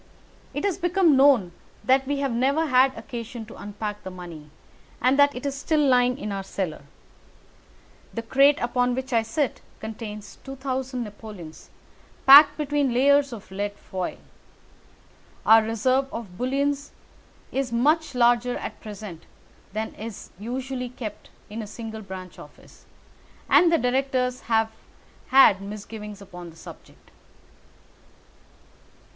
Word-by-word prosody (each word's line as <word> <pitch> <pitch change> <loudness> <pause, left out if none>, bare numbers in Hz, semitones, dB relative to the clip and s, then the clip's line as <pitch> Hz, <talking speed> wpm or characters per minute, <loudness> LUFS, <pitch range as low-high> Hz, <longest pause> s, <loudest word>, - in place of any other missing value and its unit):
It - - -2
has 385 -2 0
become 350 -3 +3
known 265 -10 +5 0.3
that 265 0 +3
we 285 0 0
have 275 -2 0
never 275 +7 +1
had 260 -2 +4
occasion 235 -2 -7
to 220 - -12
unpack 210 0 -6
the - - -7
money, 170 -5 -10 0.5
and 255 +3 +3
that 285 0 +5
it 250 - -6
is 280 - -1
still 300 +3 0
lying 250 -3 +3
in 210 -6 -5
our 195 -1 -3
cellar. 185 -6 -4 1.3
The 230 - -5
crate 275 +5 +4
upon 245 0 +1
which 260 0 -4
I 230 - +4
sit 230 +5 -2 0.2
contains 215 -1 -8
2,000 265 -1 -4
napoleons 205 -6 -10 0.6
packed 290 +2 +9
between 290 -4 0
layers 280 +2 +4
of 215 -5 -10
lead 205 +1 -3
foil. 185 -2 -5 1.3
Our 225 0 +8
reserve 255 +5 0
of 210 -6 -7
bullion 275 +6 0 0.8
is 270 -2 -2
much 290 +5 +2
larger 245 0 +3
at - - -7
present 205 -6 -9 0.4
than 215 +2 -4
is 220 -1 -8
usually 250 +3 -4
kept 235 -3 -8 0.2
in 220 +2 -6
a 215 - -7
single 220 +1 -7
branch 185 -2 -9
office, - - -16 0.6
and 345 -1 +5
the 335 - +5
directors 255 -1 0
have 225 -1 +2 0.6
had 255 -7 +6
misgivings 210 0 -8
upon 180 -2 -10
the 165 - -15
subject." 165 - -14
245 Hz, 135 wpm, -25 LUFS, 210-270 Hz, 1.3 s, packed